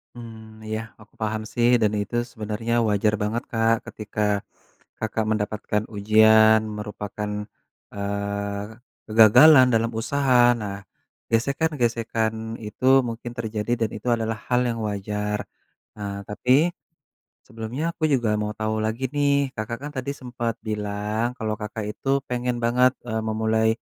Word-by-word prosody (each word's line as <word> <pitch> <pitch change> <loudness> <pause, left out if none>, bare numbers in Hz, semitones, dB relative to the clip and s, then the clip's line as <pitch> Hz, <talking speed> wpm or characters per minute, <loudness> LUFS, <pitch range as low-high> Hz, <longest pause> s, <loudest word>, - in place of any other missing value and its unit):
Mmm, 110 -2 -11
iya 110 0 -1 0.2
aku 110 - -18
paham 110 0 -1
sih 120 0 +3
dan 105 - +3
itu 105 +4 -5 0.2
sebenarnya 110 +1 -3 0.2
wajar 105 +1 +2
banget 110 +3 -1
Kak 115 0 +3 0.2
ketika 105 0 -6 0.8
Kakak 110 0 -2
mendapatkan 105 0 -1
ujian 110 +1 +6 0.2
merupakan, 105 0 -5 0.6
eee, 100 0 -3 0.4
kegagalan 125 +6 +7
dalam 115 +1 +2
usaha 140 +1 +1 0.3
nah 100 -1 -5 0.5
gesekan-gesekan 115 -4 0
itu 110 +3 -6 0.2
mungkin 115 +1 -6
terjadi 110 0 -3
dan 110 - +1
itu 110 - -9
adalah 115 -1 -2
hal 125 0 +3
yang 115 -1 -3
wajar, 105 0 -2 0.6
ah, 100 -1 -5
tapi, 130 +10 +3 0.8
sebelumnya 115 +5 -5
aku 160 - -4
juga 120 -5 +2
mau 105 0 -2
tahu 110 0 -1
lagi 115 +4 -1
nih 140 -2 +2
Kakak 110 +2 -4
kan 145 - -5
tadi 130 +2 -3
sempat 120 -2 -3
bilang 105 +2 -2
kalau 110 -2 -2
Kakak 105 0 -5
itu 135 - -8 0.2
pengen, 125 0 -1
eee, 120 - -4
banget 125 +2 +4 0.4
memulai, 110 0 +1
110 Hz, 130 wpm, -24 LUFS, 105-120 Hz, 0.8 s, kegagalan